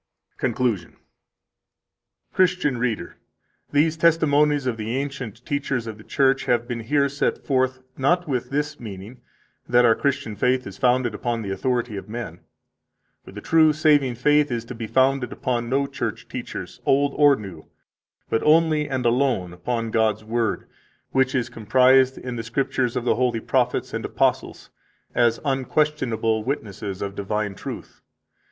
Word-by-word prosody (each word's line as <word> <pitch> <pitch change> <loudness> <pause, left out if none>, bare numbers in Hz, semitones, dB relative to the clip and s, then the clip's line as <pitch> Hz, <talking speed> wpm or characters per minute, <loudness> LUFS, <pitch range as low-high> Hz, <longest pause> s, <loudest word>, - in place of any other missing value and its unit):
CONCLUSION 120 -7 -1
181 - - -29 1.4
Christian 180 -8 +2
reader, 115 -8 -2 0.5
these 155 +3 +3
testimonies 150 -4 +3
of 125 -3 0
the 110 +3 -3
ancient 135 -5 -5
teachers 140 -4 -2
of 110 -2 -7
the - - -12
Church 135 +1 +1
have 120 -1 +1
been 120 -2 -3
here 140 +5 +1
set 140 +1 -2
forth, 130 -1 0
not 175 +6 +1
with 130 -4 -2
this 145 +1 -2
meaning 105 +2 -9 0.5
that 120 0 +5
our 115 - +6
Christian 140 -4 -2
faith 125 +4 +1
is - - -9
founded 125 -2 +2
upon 115 +1 -2
the 100 - -4
authority 120 +2 -1
of 100 - -8
men. 110 -7 -6 0.8
For - - -13
the 105 +2 -9
true 160 +2 +4
saving 145 -4 +3
faith 150 +4 +3
is 115 -1 -2
to 120 - -7
be 115 -2 -6
founded 130 +1 +2
upon 120 -2 -2
no 140 +2 +1
church 125 -6 -5
teachers, - - -7
old 140 +1 +2
or 145 -1 +6
new, 95 -9 -10 0.6
but 115 - 0
only 155 -1 +3
and 130 -2 -2
alone 120 -7 +1
upon 115 +5 -3
God's 110 -1 +1
Word, 115 +1 -2 0.4
which 130 0 +2
is 125 -3 0
comprised 130 +3 +3
in 125 -1 -6
the - - -2
Scriptures 125 +1 -1
of 120 - -2
the 120 - +2
holy 125 -2 +1
prophets 125 +1 0
and - - -3
apostles, - - -1 0.4
as 120 -1 +2
unquestionable 130 -5 0
witnesses 100 -7 -4
of 100 0 -4
divine 105 +1 -2
truth. - - -9
125 Hz, 155 wpm, -23 LUFS, 115-140 Hz, 1.4 s, our